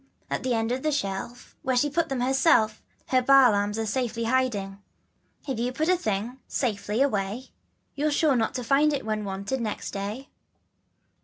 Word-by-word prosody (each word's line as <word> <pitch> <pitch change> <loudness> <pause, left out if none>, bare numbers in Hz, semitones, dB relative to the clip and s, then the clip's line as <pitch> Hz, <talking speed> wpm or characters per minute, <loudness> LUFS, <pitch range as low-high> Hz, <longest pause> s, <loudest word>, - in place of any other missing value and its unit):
At - - -1
the 255 -2 0
end 225 +1 0
of 255 +1 -1
the 310 - 0
shelf, 240 -2 -4
Where 260 -1 0
she 290 - +3
put 325 +3 0
them 265 -2 -2
herself 255 -4 +3 0.3
Her 255 -1 +3
Baa 270 -1 +6
lambs 205 +1 0
are 225 - -1
safely 230 +1 -2
hiding. 225 -6 0 0.7
If 260 -4 -2
you 245 +2 0
put 310 +6 -1
a 365 - +5
thing 215 - -1
carefully, 250 +4 -10
safely 215 -1 -1
away, 215 -1 -2 0.4
You're 295 +2 0
sure 295 -1 +2
not 230 +2 0
to 250 - -2
find 285 +5 +3
it 280 - -3
when 215 -1 -2
wanted 200 +6 -3
next 215 -2 -4
day. 210 +7 -5
245 Hz, 185 wpm, -26 LUFS, 215-270 Hz, 0.7 s, Baa